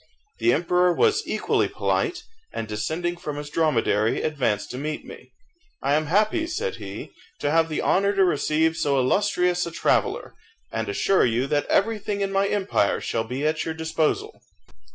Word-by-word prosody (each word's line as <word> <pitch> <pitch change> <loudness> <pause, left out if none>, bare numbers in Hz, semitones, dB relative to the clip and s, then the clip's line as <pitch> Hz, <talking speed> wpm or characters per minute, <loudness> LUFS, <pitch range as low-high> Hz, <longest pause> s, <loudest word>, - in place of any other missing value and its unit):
The 355 - +3
emperor 180 +1 +2
was 425 - +2
equally - - +1
polite, 360 -4 -1 0.3
and 115 - -4
descending 160 - -2
from 150 -4 -5
his 145 0 -7
dromedary, 115 -9 +1
advanced 130 -9 -1
to 125 - -5
meet 150 +2 -4
me. - - -12 0.5
"I 140 +1 +2
am 155 +1 +1
happy," 215 - +2
said 440 +8 -3
he, - - -8 0.3
"to 145 - -1
have 165 0 +3
the 155 - -2
honour 200 +2 +2
to 195 -1 +4
receive 160 0 +1
so 140 -3 +1
illustrious 180 +5 +1
a - - -6
traveller, - - 0 0.4
and 115 -2 -3
assure 190 - +2
you 120 +3 0
that 145 +1 0
everything 205 -1 0
in 195 0 -1
my 195 0 +2
empire 200 -1 +1
shall 115 -1 -2
be 130 +5 -3
at 155 0 0
your 160 - -4
disposal." 160 - -1
160 Hz, 170 wpm, -24 LUFS, 145-195 Hz, 0.5 s, to